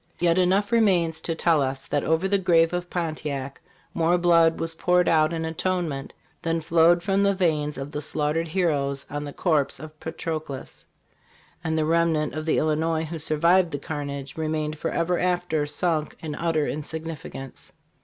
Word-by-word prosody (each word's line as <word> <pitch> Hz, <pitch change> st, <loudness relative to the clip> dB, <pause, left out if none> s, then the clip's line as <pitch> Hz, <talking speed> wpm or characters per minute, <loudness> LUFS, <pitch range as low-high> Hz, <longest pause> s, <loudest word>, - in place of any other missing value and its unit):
Yet 175 Hz, +1 st, +2 dB
enough 195 Hz, +4 st, +2 dB
remains 185 Hz, -8 st, +3 dB
to 165 Hz, -, -2 dB
tell 165 Hz, -2 st, +3 dB
us 135 Hz, 0 st, -2 dB
that 145 Hz, -, -1 dB
over 160 Hz, +4 st, +1 dB
the 200 Hz, 0 st, +2 dB
grave 165 Hz, -2 st, +3 dB
of 175 Hz, 0 st, -3 dB
Pontiac 150 Hz, -5 st, -4 dB, 0.3 s
more 170 Hz, +1 st, +2 dB
blood 170 Hz, -2 st, +4 dB
was 165 Hz, 0 st, -3 dB
poured 180 Hz, +2 st, +2 dB
out 155 Hz, -1 st, +4 dB
in 165 Hz, -1 st, -2 dB
atonement 160 Hz, -4 st, -2 dB, 0.3 s
than 165 Hz, -1 st, 0 dB
fLwed 165 Hz, +2 st, +4 dB
from 195 Hz, +1 st, +1 dB
the 200 Hz, 0 st, +3 dB
veins 155 Hz, -5 st, 0 dB
of 135 Hz, +1 st, -6 dB
the 150 Hz, -, -4 dB
slaughtered 155 Hz, +2 st, -1 dB
heroes 145 Hz, -6 st, 0 dB
on 145 Hz, 0 st, -3 dB
the 145 Hz, -, -6 dB
corpse 155 Hz, -3 st, 0 dB
of 155 Hz, 0 st, -11 dB
Patroclus; 155 Hz, -4 st, -6 dB, 0.8 s
and 160 Hz, -1 st, -1 dB
the 155 Hz, -, +1 dB
remnant 165 Hz, -1 st, +1 dB
of 155 Hz, +1 st, -5 dB
the -, -, +2 dB
Illinois 160 Hz, +1 st, +1 dB
who 165 Hz, +1 st, -5 dB
survived 170 Hz, +4 st, +3 dB
the 145 Hz, -, -3 dB
carnage 140 Hz, -2 st, -5 dB
remained 155 Hz, -1 st, -2 dB
forever 170 Hz, +3 st, -1 dB
after 180 Hz, -4 st, 0 dB
sunk 155 Hz, +1 st, -1 dB
in 155 Hz, -2 st, -5 dB
u 170 Hz, 0 st, +1 dB
ter 155 Hz, -2 st, +1 dB
insignificance." 155 Hz, -3 st, -6 dB
160 Hz, 170 wpm, -25 LUFS, 150-175 Hz, 0.8 s, blood